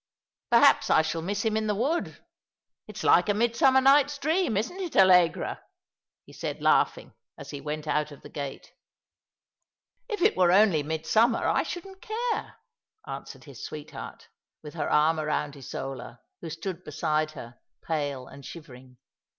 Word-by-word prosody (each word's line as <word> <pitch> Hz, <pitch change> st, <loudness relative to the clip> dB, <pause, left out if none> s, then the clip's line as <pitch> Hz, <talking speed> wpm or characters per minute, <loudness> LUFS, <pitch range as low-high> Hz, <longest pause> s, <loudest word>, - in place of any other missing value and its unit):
Perhaps -, -, +5 dB
I 160 Hz, -, +5 dB
shall 160 Hz, +1 st, -2 dB
miss 200 Hz, +5 st, -3 dB
him 220 Hz, -1 st, +1 dB
in 220 Hz, 0 st, 0 dB
the 210 Hz, -, 0 dB
wood. 285 Hz, +11 st, -2 dB, 0.6 s
It's 215 Hz, -1 st, -8 dB
like 175 Hz, +4 st, +4 dB
a 205 Hz, -, +2 dB
Midsummer 260 Hz, +4 st, +3 dB
Night's 285 Hz, +2 st, +4 dB
Dream, 310 Hz, -, 0 dB
isn't 245 Hz, -, -3 dB
it, 355 Hz, -4 st, -5 dB
Allegra? 180 Hz, -4 st, +4 dB, 0.3 s
" -, -, -66 dB
he -, -, -16 dB
said, -, -, -5 dB
laughing, -, -, +1 dB, 0.2 s
as -, -, -9 dB
he 145 Hz, -, -7 dB
went 150 Hz, +2 st, -5 dB
out 150 Hz, 0 st, -1 dB
of 145 Hz, -, -13 dB
the -, -, -9 dB
gate. 140 Hz, -2 st, -7 dB, 0.7 s
*' -, -, -55 dB
If 420 Hz, -6 st, -2 dB
it -, -, +4 dB
were 180 Hz, -2 st, +4 dB
only 190 Hz, -5 st, +5 dB
midsummer, 160 Hz, +10 st, +1 dB
I -, -, +2 dB
shouldn't 380 Hz, +2 st, -7 dB
care," 460 Hz, +2 st, -3 dB, 0.5 s
answered -, -, -8 dB
his -, -, -11 dB
sweetheart, -, -, -8 dB, 0.4 s
with 150 Hz, -, -9 dB
her 170 Hz, -, -3 dB
arm 155 Hz, +2 st, +3 dB
round 150 Hz, -1 st, -2 dB
Isola, 130 Hz, -2 st, -7 dB, 0.2 s
who 165 Hz, -, -6 dB
stood 170 Hz, +3 st, -6 dB
beside 155 Hz, 0 st, -1 dB
her, 120 Hz, -3 st, -11 dB, 0.2 s
pale 145 Hz, -5 st, -3 dB
and 140 Hz, -, -13 dB
shivering. 130 Hz, -5 st, -12 dB
170 Hz, 160 wpm, -27 LUFS, 150-235 Hz, 0.7 s, Perhaps